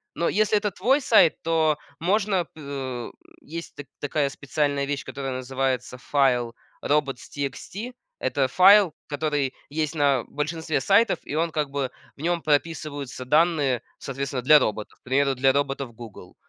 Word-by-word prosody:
Но 170 - 0
если 215 +1 +2
это 205 0 0
твой 265 +9 +2
сайт, 225 - +4
то 160 -2 +2 0.2
можно 195 +1 +1
п 135 -6 -6 0.3
есть 165 +2 -8
та 145 - -7 0.2
такая 145 0 0
специальная 140 0 -1
вещь, 145 0 -3
которая 135 -1 -5
называется 130 0 -2
файл 125 -4 +1 0.3
"Robots.txt", 145 - -3 0.3
это 135 -2 0
файл, 195 +3 +7 0.2
который 145 -3 -1 0.2
есть 155 +1 -2
на 140 -4 +2
большинстве 155 0 -2
сайтов, 205 +8 +3
и 145 - -5
он 165 +1 0
как 150 -2 -1
бы 140 -2 -2 0.3
в 140 - -12
нем 170 +1 0
прописываются 145 -4 -2
данные 150 -3 +2 0.2
соответственно 135 -1 -4
для 150 +4 +7
роботов, 110 -3 -3
к - - -68
примеру, 135 +1 +1
для 135 +1 +3
роботов 140 -3 -1
"Гугл". 110 -6 -11
145 Hz, 145 wpm, -25 LUFS, 135-165 Hz, 0.3 s, файл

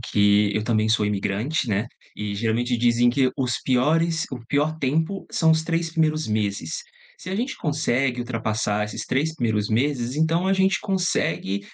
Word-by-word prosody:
que 105 -1 +3
eu 105 - 0
também 110 -2 +1
sou 110 -1 +2
imigrante, 105 +8 -1
né, 105 +2 0 0.3
e, 105 -1 -4
geralmente, 115 +3 0
dizem 120 +1 +3
que 130 +1 +2
os 125 -3 -1
piores 160 +6 +2
o 130 - -4
pior 150 +2 +1
tempo 160 +8 -1
são 160 -1 +3
os 160 0 +3
3 165 0 -1
primeiros 155 -1 +1
meses. 100 -6 -2 0.3
Se 185 - -8
a 190 - -2
gente 245 +5 -2
consegue 135 -4 0
ultrapassar 110 -3 -1
esses 105 - -6
3 155 +5 0
primeiros 110 -6 0
meses, 125 +2 0
então 165 +4 +1
a - - +3
gente 190 0 +2
consegue 180 - -1
125 Hz, 170 wpm, -23 LUFS, 110-160 Hz, 0.3 s, que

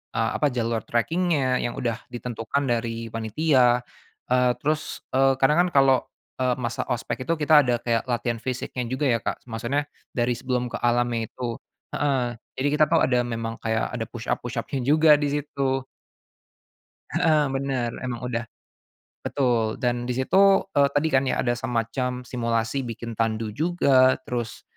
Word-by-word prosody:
eee, 115 0 +1
apa 150 - +3
jalur 115 -3 -1
tracking-nya 140 0 +1
yang 120 - -2
udah 120 -2 -2
ditentukan 120 +2 -3
dari 115 -2 -2
panitia, 120 +2 +2 0.5
eee, 125 0 +4
terus, 155 +1 -2
eee, 135 0 +4
kadang 150 +7 +3
kan - - -3
kalau, 135 -1 +6 0.4
eee, 125 -1 +2
masa 120 -2 -3
ospek 125 +1 -3
itu 165 - +2
kita 155 0 +5
ada 125 -4 +2
kayak 115 0 0
latihan 120 -1 -1
fisiknya 125 0 -4
juga 130 +4 -3
ya, 120 -4 +3
Kak, - - -4
maksudnya 120 +6 -1 0.3
dari 120 0 +1
sebelum 125 0 -2
ke - - -4
alam 120 0 +2
itu 115 +1 -4 0.3
heeh, 130 -5 -1 0.2
jadi 135 +2 -1
kita 155 - +6
tahu 165 +2 +2
ada 125 -2 +2
memang 115 -1 -4
kayak 110 -1 -1
ada - - -3
push-up - - -3
push-up-nya - - -3
juga 150 +1 +6
disitu. 140 -2 -1 1.3
Heeh, 155 -3 +3
bener 135 -3 -1 0.2
emang 120 -2 -4
udah 120 -2 -3 0.8
betul 120 -5 0
dan 120 0 -1
disitu, 190 +11 +4
eee, 140 -4 +4
tadi 145 +2 +2
kan 135 0 +3
ya - - 0
ada 120 - +1
semacam 125 +1 -2
simulasi 115 0 -1
bikin 115 0 -6
tandu 110 -1 -1
juga 135 -2 +3
terus, 120 -3 -4
125 Hz, 155 wpm, -25 LUFS, 115-140 Hz, 1.3 s, kalau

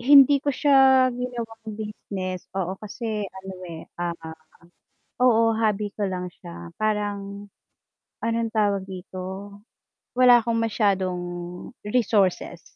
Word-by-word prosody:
Hindi 280 +2 +7
ko 290 - -3
siya 265 -2 +5
ginawang 230 -3 -5
business 195 -4 -5
oo, 185 -1 -1
kasi 215 -1 -4
ano, 190 0 -9 0.2
eh, 165 -1 -8 0.2
ah 175 -1 -1 1.1
oo, 230 -2 +5
hobby 210 -2 0
ko 205 -2 -2
lang 180 -1 -4
siya. 85 0 -9
Parang 205 -1 -2 0.8
anong 230 0 0
tawag 205 -3 +1
dito? 190 +2 -7 0.6
Wala 250 -1 +7
akong 230 0 -1
masyadong 195 -5 +1 0.6
resources 205 -6 +1
210 Hz, 110 wpm, -25 LUFS, 190-230 Hz, 1.1 s, Hindi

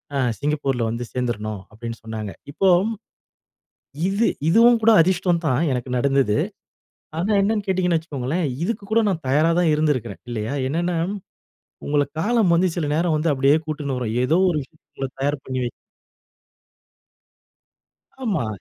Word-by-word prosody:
ஆ 140 - +1 0.2
சிங்கப்பூர்‌ல 140 -4 -1
வந்து 115 +2 -3
சேர்ந்துரனும் 110 -5 -3
அப்படின்னு 115 +1 -7
சொன்னாங்க. 110 -2 -5 0.2
இப்போ, 190 +6 +2 1.4
இது 205 +4 +2 0.2
இதுவும் 230 +6 +6
கூட 230 - +6
அதிர்ஷ்டம் 180 0 +2
தான்.எனக்கு 130 -3 0
நடந்தது. 135 -4 +2 0.8
ஆனா, 190 +6 0
என்னன்னு 205 +1 0
கேட்டீங்கன்னு 180 -3 +2
வச்சுக்கோங்களேன், 155 +1 -2 0.2
இதுக்கு 210 +1 -3
கூட 230 - +5
நான் 170 -4 -2
தயாரா 150 +5 +3
தான் 165 -3 +3
இருந்திருக்கிறேன் 140 -9 -1
இல்லையா? 110 +3 -3
என்னனா, 170 +3 -1 0.9
உங்கள 145 0 +2 0.2
காலம் 220 -3 +2
வந்து 180 +2 +3
சில 160 -4 -1
நேரம் 165 0 +1
வந்து 155 +1 +1
அப்படியே 140 +2 +4
கூட்டினு 145 -4 -3
வரும். 115 -3 -3
ஏதோ 160 +6 +3
ஒரு 165 - -1
விஷயத்த 155 +3 -19
உங்கள 135 -1 -2
தயார் 145 0 -1
பண்ணிவை 130 -2 -2 2.5
ஆமா. 195 - 0
150 Hz, 130 wpm, -22 LUFS, 125-175 Hz, 2.5 s, இதுவும்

